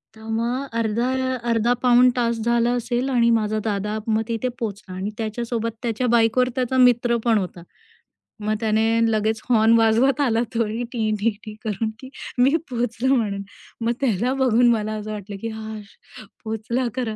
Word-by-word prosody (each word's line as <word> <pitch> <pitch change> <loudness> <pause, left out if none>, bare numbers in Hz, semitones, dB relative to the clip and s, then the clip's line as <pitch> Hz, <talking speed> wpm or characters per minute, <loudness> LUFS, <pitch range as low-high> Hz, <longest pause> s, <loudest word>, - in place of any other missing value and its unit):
तर 220 - -15
मग 235 +4 -1 0.2
अर्धा 230 +2 0 0.4
अर्धा 230 +1 +2
पाऊण 250 0 +6
तास 235 -1 0
झाला 235 0 +2
असेल 245 +2 -1
आणि 235 -3 +3
माझा 215 -1 +1
दादा 210 0 -1
मग 220 0 +2
तिथे 230 +1 -2
पोहोचला. 200 -5 -5
आणि 190 +2 -3
त्याच्यासोबत 230 +1 -3
त्याच्या 235 +1 -1
बाइकवर 235 +2 +3
त्याचा 260 0 0
मित्र 240 -1 +4
पण 230 -2 +4
होता. 180 -3 -4 0.8
मग 215 0 -1
त्याने 220 0 +2 0.3
लगेच 220 0 0
हॉर्न 225 -1 +5
वाजवत 230 +5 +3
आला 235 -4 +2
तोही 230 +1 -1
टी-टी-टी 215 -2 -2
करून, 220 0 -2
की 260 - -10 0.3
मी 260 +5 +4
पोहचलो 245 +1 0
म्हणून. 205 -5 -1 0.4
मग 230 +1 +1
त्याला 245 -1 +1
बघून 250 -3 +3
मला 215 -1 -1
असं 215 0 -6
वाटलं, 205 -1 -6
की 230 - -3
"हाशः 220 -1 -10 0.2
पोहोचला 225 +3 -2
खरा," 240 -4 -2
230 Hz, 155 wpm, -22 LUFS, 215-245 Hz, 0.8 s, पाऊण